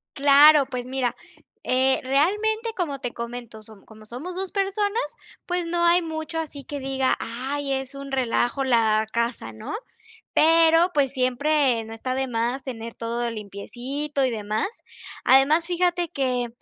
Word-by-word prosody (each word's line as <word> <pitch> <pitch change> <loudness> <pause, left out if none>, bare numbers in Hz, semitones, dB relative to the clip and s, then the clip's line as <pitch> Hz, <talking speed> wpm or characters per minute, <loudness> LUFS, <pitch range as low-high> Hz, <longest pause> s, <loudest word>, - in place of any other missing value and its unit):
Claro. 285 +1 +7
Pues 250 -2 -5
mira, 255 -1 -2 0.5
eh, 260 +1 +2
realmente, 420 - +1
como 290 -7 -2
te 245 -3 -5
comento, 235 -2 -7
som 215 -2 -15
como 215 -1 -15
somos 295 +11 -7
2 380 0 -3
personas, 405 +2 0 0.4
pues 355 -1 -1
no 345 0 -1
hay 345 +1 +5
mucho, 320 0 -4
así 290 -3 -6
que 290 -1 -6
diga: 265 -1 0
"Ay, 270 +4 -3
es 265 +1 -4
un 275 0 -8
relajo 255 0 0
la 220 -4 +3
casa", 235 +1 -2
¿no? 220 - -8 0.6
Pero, 330 +2 +5
pues 275 -3 +2
siempre, 255 -1 +1
no 225 - -9
está 255 +3 -3
de 265 0 -1
más, 240 +3 -2
tener 230 -3 -7
todo 235 +1 -2
limpiecito 250 +7 -4
y 255 - 0
demás. 215 - -3 0.4
Además, 295 +6 +5
fíjate 350 -1 0
que, 250 -3 -1
270 Hz, 150 wpm, -24 LUFS, 240-320 Hz, 0.6 s, Claro